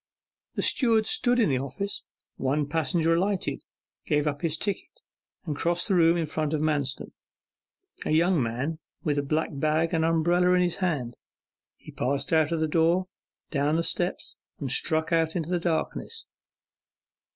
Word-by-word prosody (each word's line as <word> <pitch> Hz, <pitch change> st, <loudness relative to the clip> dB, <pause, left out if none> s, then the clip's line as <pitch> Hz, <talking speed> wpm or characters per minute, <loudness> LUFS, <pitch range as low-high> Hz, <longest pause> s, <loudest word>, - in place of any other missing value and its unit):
The -, -, -1 dB
steward 225 Hz, -4 st, +3 dB
stood 245 Hz, +2 st, +2 dB
in 225 Hz, -, +3 dB
the 130 Hz, -2 st, +1 dB
office. 140 Hz, +10 st, -4 dB, 0.3 s
One 140 Hz, +2 st, 0 dB
passenger 165 Hz, +2 st, +1 dB
alighted, 190 Hz, +3 st, -1 dB, 0.4 s
gave 150 Hz, 0 st, +2 dB
up 145 Hz, 0 st, -2 dB
his 160 Hz, -2 st, 0 dB
ticket, 200 Hz, +4 st, -3 dB, 0.6 s
and 155 Hz, -4 st, -2 dB
crossed 170 Hz, +6 st, 0 dB
the 200 Hz, -, +1 dB
room 170 Hz, -1 st, +4 dB
in 165 Hz, -, 0 dB
front 155 Hz, 0 st, -2 dB
of -, -, -1 dB
Manston: 145 Hz, -4 st, -1 dB, 0.9 s
a -, -, -3 dB
young 165 Hz, +1 st, +3 dB
man 130 Hz, +7 st, -2 dB, 0.2 s
with 145 Hz, -2 st, +1 dB
a -, -, +2 dB
black 155 Hz, +3 st, -1 dB
bag 155 Hz, +3 st, 0 dB
and 160 Hz, -1 st, +2 dB
umbrella 170 Hz, +2 st, +3 dB
in 180 Hz, 0 st, +4 dB
his 175 Hz, -1 st, -1 dB
hand. 150 Hz, -11 st, -2 dB, 0.6 s
He -, -, -13 dB
passed 140 Hz, +3 st, -1 dB
out 160 Hz, -1 st, +3 dB
of 165 Hz, -1 st, 0 dB
the 160 Hz, -, +2 dB
door, 170 Hz, +4 st, +2 dB, 0.4 s
down 145 Hz, +1 st, +1 dB
the 165 Hz, -, +1 dB
steps, 175 Hz, +1 st, -1 dB, 0.2 s
and 135 Hz, -4 st, -3 dB
struck 160 Hz, +4 st, +2 dB
out 160 Hz, -1 st, +2 dB
into 170 Hz, -1 st, -2 dB
the 180 Hz, -, +1 dB
darkness. 175 Hz, -, -3 dB
160 Hz, 165 wpm, -27 LUFS, 150-175 Hz, 0.9 s, room